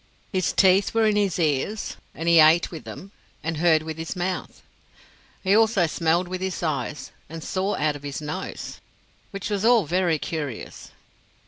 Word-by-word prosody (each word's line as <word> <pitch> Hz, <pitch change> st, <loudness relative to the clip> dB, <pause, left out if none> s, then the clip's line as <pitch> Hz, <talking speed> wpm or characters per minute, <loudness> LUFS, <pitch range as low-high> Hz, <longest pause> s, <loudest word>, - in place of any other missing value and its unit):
His 185 Hz, -2 st, +1 dB
teeth 190 Hz, +2 st, +4 dB
were 225 Hz, -1 st, +4 dB
in 215 Hz, -1 st, +3 dB
his 200 Hz, -4 st, +1 dB
ears, 165 Hz, +6 st, -1 dB, 0.2 s
and 165 Hz, -, -5 dB
he 170 Hz, -1 st, +6 dB
ate 160 Hz, +2 st, +5 dB
with 160 Hz, -, -8 dB
them 195 Hz, +2 st, -9 dB, 0.3 s
and 165 Hz, 0 st, -2 dB
heard 160 Hz, -1 st, +3 dB
with 160 Hz, 0 st, -6 dB
his 160 Hz, +4 st, -4 dB
mouth. 180 Hz, +1 st, -4 dB, 0.8 s
He 195 Hz, +1 st, +3 dB
also 220 Hz, -4 st, +4 dB
smelled 165 Hz, +2 st, +1 dB
with 185 Hz, 0 st, -5 dB
his 190 Hz, -1 st, -3 dB
eyes 150 Hz, -2 st, -3 dB, 0.2 s
and 165 Hz, 0 st, -7 dB
saw 195 Hz, +2 st, -1 dB
out 150 Hz, 0 st, 0 dB
of 145 Hz, -, -9 dB
his 145 Hz, -1 st, -5 dB
nose 155 Hz, +5 st, -6 dB, 0.5 s
which 195 Hz, +1 st, -5 dB
was 200 Hz, -1 st, -1 dB
all 230 Hz, -4 st, +5 dB
very 175 Hz, 0 st, +1 dB
curious. 145 Hz, -6 st, -6 dB
175 Hz, 175 wpm, -24 LUFS, 155-195 Hz, 0.8 s, he